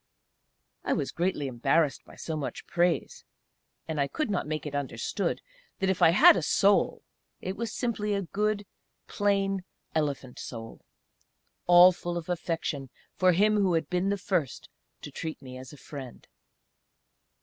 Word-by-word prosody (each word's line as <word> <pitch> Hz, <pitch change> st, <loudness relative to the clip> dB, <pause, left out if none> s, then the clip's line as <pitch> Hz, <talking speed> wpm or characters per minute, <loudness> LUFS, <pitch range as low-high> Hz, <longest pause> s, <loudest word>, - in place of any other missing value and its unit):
I -, -, +1 dB
was 135 Hz, -, -1 dB
greatly 175 Hz, -4 st, -1 dB
embarrassed 135 Hz, +4 st, +1 dB
by -, -, -15 dB
so 160 Hz, -, -5 dB
much 150 Hz, -3 st, -5 dB
praise: 175 Hz, 0 st, 0 dB, 0.6 s
and 155 Hz, -3 st, -1 dB
I 140 Hz, -, +1 dB
could 305 Hz, -, -2 dB
not 180 Hz, -6 st, -1 dB
make 155 Hz, 0 st, -3 dB
it 150 Hz, -, -5 dB
understood 145 Hz, -2 st, -2 dB, 0.3 s
that 190 Hz, 0 st, +1 dB
if 190 Hz, -, -3 dB
I -, -, +8 dB
had 180 Hz, +4 st, +8 dB
a 180 Hz, -, 0 dB
"Soul," 195 Hz, +6 st, +2 dB, 0.4 s
it 185 Hz, -, -4 dB
was 230 Hz, 0 st, -3 dB
simply 215 Hz, -4 st, -1 dB
a 200 Hz, -, -1 dB
good, 210 Hz, +3 st, -1 dB, 0.4 s
plain, 195 Hz, -2 st, 0 dB, 0.3 s
elephant 140 Hz, -5 st, -2 dB
soul 115 Hz, -2 st, -8 dB, 0.9 s
all 175 Hz, +1 st, +9 dB
full 175 Hz, -1 st, -4 dB
of 170 Hz, 0 st, -6 dB
affection 165 Hz, -5 st, -2 dB, 0.2 s
for 185 Hz, -1 st, +3 dB
him 210 Hz, +4 st, +3 dB
who 190 Hz, -4 st, +2 dB
had 160 Hz, -3 st, -1 dB
been 180 Hz, +2 st, +1 dB
the 200 Hz, -, 0 dB
first 180 Hz, -7 st, -2 dB, 0.3 s
to -, -, -7 dB
treat 160 Hz, -1 st, -5 dB
me 130 Hz, -2 st, -10 dB
as 130 Hz, -, -10 dB
a 150 Hz, -, -12 dB
friend. 135 Hz, -3 st, -10 dB
175 Hz, 160 wpm, -28 LUFS, 145-195 Hz, 0.9 s, all